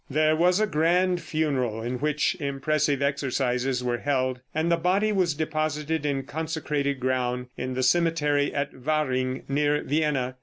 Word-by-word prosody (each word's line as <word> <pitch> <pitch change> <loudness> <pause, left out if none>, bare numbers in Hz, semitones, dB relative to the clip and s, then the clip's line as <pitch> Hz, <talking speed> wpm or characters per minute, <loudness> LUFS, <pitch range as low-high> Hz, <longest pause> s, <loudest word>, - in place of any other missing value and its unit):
There 155 +2 +3
was 180 +4 +3
a 215 - +3
grand 180 +1 +2
funeral, 140 -8 -1
in 125 +1 -3
which 150 0 +1
impressive 140 0 0
exercises 130 -2 0
were 120 -1 -1
held, 130 -2 0
and 160 +2 0
the - - +5
body 185 +6 +1
was 180 -7 +1
deposited 155 0 -1
in 135 -1 -1
consecrated 150 -2 -2
ground 125 -1 -1
in 130 0 -4
the 130 - 0
cemetery 150 -1 +2
at 140 0 -2
Wahring, 130 -2 -1
near 145 +1 +1
Vienna. 140 -4 0
145 Hz, 150 wpm, -26 LUFS, 130-155 Hz, -, the